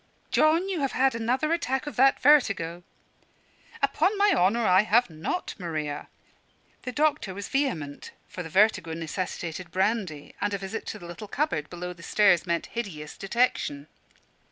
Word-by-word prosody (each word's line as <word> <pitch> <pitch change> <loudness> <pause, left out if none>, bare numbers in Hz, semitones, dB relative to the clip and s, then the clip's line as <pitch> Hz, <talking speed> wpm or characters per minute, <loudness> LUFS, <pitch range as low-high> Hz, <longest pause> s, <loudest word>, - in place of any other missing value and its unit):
"John, 325 +4 +3
you 380 -4 -2
have 275 -3 -1
had 265 0 +3
another 250 +8 0
attack 265 -5 -1
of 295 - -6
that 270 +2 +4
vertigo." 200 - +3 1.0
"Upon 405 +3 +2
my 405 0 +4
honour 220 +6 +2
I 185 0 +6
have 220 -1 +2
not, 160 - -3
Maria." 155 -4 -4 0.7
The 250 - -5
doctor 290 -9 0
was 200 0 -6
vehement; 180 - -2 0.2
for 180 - -7
the 165 - -7
vertigo 190 -3 +3
necessitated 170 +1 -4
brandy, 190 -5 -1
and 205 0 0
a - - -2
visit 195 +3 -6
to - - -4
the 175 - -11
little 175 +5 -8
cupboard 200 - -1
below 180 0 -6
the 170 - -16
stairs 185 -2 +3
meant 170 -1 0
hideous 160 -11 -5
detection. 195 - 0
200 Hz, 155 wpm, -27 LUFS, 170-260 Hz, 1.0 s, I